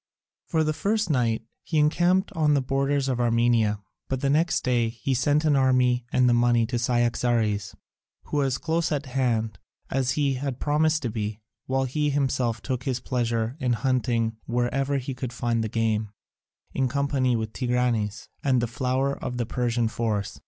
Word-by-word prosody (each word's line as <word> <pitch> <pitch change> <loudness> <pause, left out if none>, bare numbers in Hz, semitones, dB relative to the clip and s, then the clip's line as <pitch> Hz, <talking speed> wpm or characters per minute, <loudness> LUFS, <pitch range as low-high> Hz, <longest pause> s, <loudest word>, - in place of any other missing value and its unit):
For 160 -3 +1
the 155 0 0
first 210 +2 0
night 115 -5 +1 0.2
he 160 - -2
encamped 175 +5 +3
on 150 -2 +2
the 140 - +2
borders 135 +1 0
of 130 -2 -1
Armenia, 115 -3 +2 0.3
but 130 -1 -2
the 140 - +1
next 160 +3 +2
day 120 -3 +1
he 120 +4 -3
sent 145 +5 +2
an 150 -2 +4
army 125 -2 +2
and 125 0 +3
the 120 - +4
money 120 -1 +3
to 120 +1 -2
Cyaxares, 120 -3 0 0.5
who - - -4
was 135 -3 +1
close 165 0 -1
at 145 -1 -1
hand, 120 -5 -1 0.3
as 130 -1 +1
he 140 -2 +1
had 130 -1 -4
promised 155 +1 +1
to 120 - -1
be, 105 -1 -4 0.3
while 135 0 +1
he 150 +3 0
himself 130 -5 0
took 130 -2 -3
his 130 -3 -1
pleasure 120 -1 -1
in 125 -4 +1
hunting 115 -2 0
wherever 130 +4 0
he 135 0 -4
could 125 -1 -5
find 115 -1 0
the 110 - -3
game, 110 -1 0 0.6
in 135 -1 +1
company 135 -1 +1
with 110 -1 -3
Tigranes 120 -4 -1 0.2
and 130 -3 +3
the 120 - +1
flower 130 +3 -1
of 125 - -3
the 120 - -1
Persian 120 -1 0
force. 110 -3 -2
125 Hz, 175 wpm, -25 LUFS, 115-140 Hz, 0.6 s, an